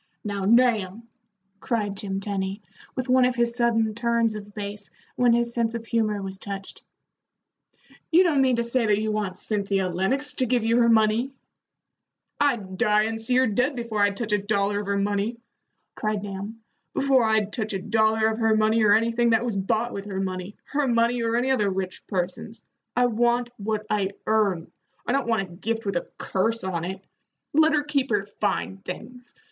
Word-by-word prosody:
"Now, 200 -2 -3
Nahum," 225 -2 +2 0.5
cried 210 -3 -1
Jim 195 -1 -3
Tenny, 195 0 -3 0.3
with 255 0 -3
one 255 0 +5
of 250 0 +2
his 235 -1 +1
sudden 225 -3 +2
turns 235 -1 +1
of 205 -1 -9
base 205 -1 -6 0.3
when 245 -1 +4
his 235 0 +2
sense 235 -1 +1
of 230 -1 -5
humor 215 -3 0
was 190 0 -5
touched, 195 -2 -7 1.3
"you 345 +3 +6
don't 310 -6 +3
mean 260 -2 +3
to 235 - 0
say 235 +1 0
that 205 -1 +3
you 215 0 -1
want 205 -3 -2
Cynthia 195 -3 -1
Lennox 225 +12 -1
to 255 - +1
give 240 -1 +1
you 230 +1 +2
her 235 -1 +4
money?" 225 +3 +3 1.1
"I'd 215 -10 0
die, 210 0 +4
and 225 0 -3
see 250 +3 0
her 260 +1 +5
dead, 250 +6 +1
before 230 -4 -2
I'd 205 -1 +2
touch 225 -1 -3
a 210 - +3
dollar 205 0 0
of 205 - -5
her 200 0 0
money!" 205 +3 -1 0.6
cried 215 -1 -2
Nahum 205 +3 -6 0.3
"before 270 -2 +3
I'd 220 -2 +1
touch 215 -3 -1
a 195 - -1
dollar 220 +2 +2
of 220 +1 -3
her 225 -1 +3
money 215 +1 +3
or 210 -1 +5
anything 230 +1 +2
that 230 +1 +3
was 235 -4 -2
bought 220 +5 0
with 200 0 -5
her 195 -2 -4
money, 185 +1 -4 0.2
her 290 -1 +1
money 235 0 +2
or 230 0 0
any 250 +2 +1
other 210 -6 +2
rich 185 -1 -4
person's. 195 +4 -4 0.3
I 245 - +4
want 240 +1 +1
what 215 +1 -2
I 200 -2 0
earn. 200 -6 +1 0.3
I - - -1
don't 275 -1 0
want 225 -4 +1
a 180 -3 -11
gift 225 +5 -3
with 200 -2 -2
a 175 - -2
curse 225 +4 -1
on 175 -3 -2
it. 190 +1 -6 0.5
Let 315 +1 +5
her 295 -1 +2
keep 285 -3 -1
her 205 -3 +1
fine 195 -1 -1
things. 235 +6 -9
220 Hz, 195 wpm, -25 LUFS, 200-235 Hz, 1.3 s, you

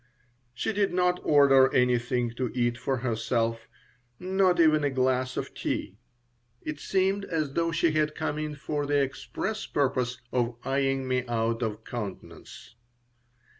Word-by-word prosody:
She 220 - -1
did 200 -1 +1
not 180 0 +2
order 135 -2 +5
anything 125 -1 +2
to 120 0 -3
eat 120 -1 +1
for 130 +2 -2
herself, 115 -1 -1 0.5
not 185 -1 +2
even 155 -2 +5
a 145 - +2
glass 130 -1 0
of - - -4
tea. 100 - -4 0.6
It 150 -1 -5
seemed 195 +3 +1
as 155 -6 -2
though 165 +1 +1
she 165 0 +2
had 155 0 0
come 150 - -2
in 155 -1 -3
for 145 0 -3
the 145 0 +2
express 140 +10 -3
purpose 130 -3 0
of 120 -1 0
eying 135 0 0
me 130 -1 +1
out 115 0 -1
of 110 -1 -3
countenance. 105 -1 -8
135 Hz, 145 wpm, -27 LUFS, 120-155 Hz, 0.6 s, order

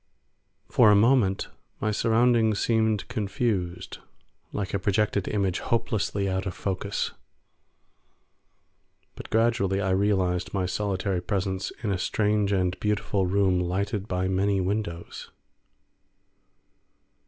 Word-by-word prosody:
For 110 - +5
a 105 - +6
moment 105 -3 +3 0.3
my 110 - 0
surroundings 115 -1 +3
seemed 110 -2 +1
confused, 100 -6 -2 0.5
like 100 -2 -4
a 100 - +1
projected 100 0 0
image 95 -4 0
hopelessly 105 -3 -1
out 95 +1 -1
of 90 - -4
focus, 100 +1 -2 2.0
but - - -10
gradually 110 -4 +2
I 95 -1 0
realised 95 -2 +1
my 95 -2 0
solitary 95 -1 -1
presence 95 0 -2
in 105 - 0
a 95 - -1
strange 105 +1 +1
and 90 -2 0
beautiful 105 -2 0
room 95 -1 +2
lighted 100 +3 -2
by 90 -1 -1
many 95 +1 +1
windows. 95 -3 -3
100 Hz, 110 wpm, -26 LUFS, 95-105 Hz, 2.0 s, a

